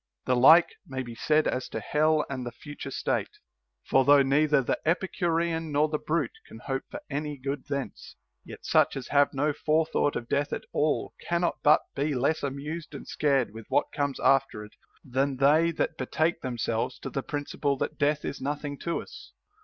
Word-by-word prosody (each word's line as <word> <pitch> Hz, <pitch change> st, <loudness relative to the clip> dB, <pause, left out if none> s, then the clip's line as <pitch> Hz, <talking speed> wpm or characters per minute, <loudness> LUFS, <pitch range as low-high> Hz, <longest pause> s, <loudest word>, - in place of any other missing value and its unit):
The 125 Hz, -, +2 dB
like 160 Hz, +8 st, +7 dB, 0.2 s
may 130 Hz, -1 st, -4 dB
be 120 Hz, -2 st, -8 dB
said 150 Hz, +6 st, +2 dB
as 130 Hz, 0 st, -2 dB
to -, -, -4 dB
hell 155 Hz, 0 st, +2 dB
and 130 Hz, -2 st, -4 dB
the 120 Hz, -, -5 dB
future 145 Hz, +5 st, -9 dB
state. -, -, -1 dB, 0.5 s
For 135 Hz, -, +3 dB
though 140 Hz, 0 st, +6 dB
neither 145 Hz, +1 st, +3 dB
the -, -, -1 dB
Epicurean 165 Hz, -2 st, 0 dB
nor 150 Hz, +2 st, +2 dB
the 150 Hz, -1 st, -1 dB
brute 170 Hz, -, -2 dB
can -, -, -11 dB
hope -, -, -4 dB
for 295 Hz, -, -7 dB
any 150 Hz, 0 st, -4 dB
good 135 Hz, +1 st, -5 dB
thence; 140 Hz, -2 st, -5 dB, 0.3 s
yet -, -, -11 dB
such -, -, +3 dB
as 130 Hz, -, -7 dB
have 145 Hz, 0 st, +4 dB
no 145 Hz, +2 st, 0 dB
forethought 155 Hz, -1 st, +1 dB
of 120 Hz, -, -4 dB
death 145 Hz, +3 st, 0 dB
at -, -, -4 dB
all 150 Hz, 0 st, 0 dB
cannot 170 Hz, 0 st, 0 dB
but 150 Hz, +1 st, +5 dB
be 145 Hz, +1 st, -1 dB
less 140 Hz, +5 st, +1 dB
amused 145 Hz, +4 st, -5 dB
and -, -, -9 dB
scared 135 Hz, -8 st, +1 dB
with 110 Hz, -1 st, -10 dB
what -, -, +1 dB
comes 140 Hz, -2 st, -1 dB
after 135 Hz, -6 st, +2 dB
it 105 Hz, -, -17 dB, 0.3 s
than 135 Hz, +1 st, -1 dB
they 150 Hz, +5 st, +4 dB
that 160 Hz, 0 st, -2 dB
betake 160 Hz, +6 st, 0 dB
themselves 120 Hz, -1 st, -2 dB
to -, -, -7 dB
the 135 Hz, -, -2 dB
prin 145 Hz, +1 st, -4 dB
ciple 140 Hz, -1 st, -1 dB
that -, -, -4 dB
death 150 Hz, 0 st, +1 dB
is -, -, -5 dB
nothing 145 Hz, +1 st, -4 dB
to 170 Hz, -, -2 dB
us. -, -, -13 dB
145 Hz, 190 wpm, -27 LUFS, 135-155 Hz, 0.5 s, like